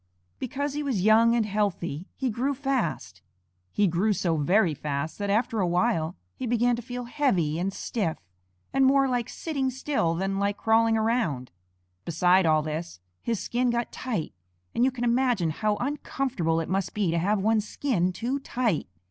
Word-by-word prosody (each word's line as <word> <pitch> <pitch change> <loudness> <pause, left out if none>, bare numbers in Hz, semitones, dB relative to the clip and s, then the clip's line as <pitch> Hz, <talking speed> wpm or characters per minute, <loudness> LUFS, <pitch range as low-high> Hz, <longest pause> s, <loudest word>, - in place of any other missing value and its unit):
Because 275 +3 -3
he 295 - -2
was 255 -10 -1
young 225 +2 +5
and 230 -2 +2
healthy 195 -5 -2
he 260 -3 -1
grew 265 +6 -1
fast. 270 -2 -2 0.5
He 205 - +2
grew 190 +4 +2
so 175 -4 0
very 170 +3 +3
fast 145 +3 -4
that 200 0 -2
after 225 +2 +1
a 185 - +2
while 170 -2 +1 0.2
he 255 - -4
began 240 +1 +2
to 235 - -5
feel 245 +1 -6
heavy 195 - 0
and 190 +2 -1
stiff, 195 -4 -2 0.6
and 270 - +3
more 270 +1 +5
like 245 -3 -1
sitting 280 -5 -2
still 260 - 0
than 195 +2 -1
like 200 0 0
crawling 225 0 +3
around. 220 - 0 0.5
Beside 180 +2 +3
all 155 -1 +3
this, 155 - -5 0.2
his 230 -4 -1
skin 245 +1 0
got 235 0 -1
tight, 220 -12 -3 0.4
and 235 - +1
you 260 - +5
can 250 -2 -5
imagine 240 -8 +2
how 210 +6 0
uncomfortable 250 - -1
it 160 - -5
must 190 +1 -2
be 200 -5 +1
to 170 - +1
have 205 +5 +1
one's 215 +1 +1
skin 185 -11 0
too 245 +9 -2
tight. 240 - -1
215 Hz, 175 wpm, -27 LUFS, 175-250 Hz, 0.6 s, young